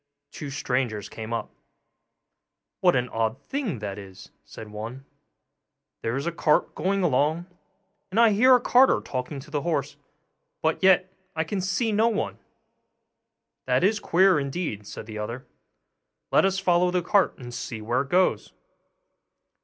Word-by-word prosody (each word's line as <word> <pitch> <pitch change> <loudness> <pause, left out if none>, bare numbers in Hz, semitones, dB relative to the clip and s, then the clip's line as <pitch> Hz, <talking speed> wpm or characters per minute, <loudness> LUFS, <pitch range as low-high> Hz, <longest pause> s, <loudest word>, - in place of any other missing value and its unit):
two 145 - -7
strangers 125 -7 -2
came 110 0 -8
up. 115 - -4 1.3
'What - - +4
an 125 0 +1
odd 115 +2 -1
thing 260 - -2
that 105 -2 -5
is!' 95 -2 -12
said 110 - -11
one: 115 +6 -7 1.0
'there 115 +1 -2
is 140 - -3
a 170 - 0
cart 155 -2 +1
going 195 +1 0
along, 155 +3 +1 0.6
and 200 +4 0
I 230 -2 +6
hear 250 +5 +6
a - - +4
carter 250 +2 +4
talking 130 +2 -5
to 150 +2 -15
the 145 -1 -1
horse, 145 -4 -2 0.7
but 160 0 +1
yet 185 -1 +4 0.2
I 160 - 0
can 190 +4 -3
see 195 +5 0
no 215 +2 +3
one.' 220 -3 -2 1.3
'That - - +2
is 205 +2 +3
queer, 185 -2 +4
indeed,' 140 - -4
said - - -8
the 110 -1 -7
other; 115 +4 -5 0.9
'let - - +5
us 195 0 +1
follow 180 -2 +3
the 180 -1 0
cart, 195 +2 +2
and 120 -2 -9
see 115 -1 -5
where 120 +4 0
it 135 - -7
goes. 185 +3 +1
150 Hz, 155 wpm, -25 LUFS, 120-190 Hz, 1.3 s, I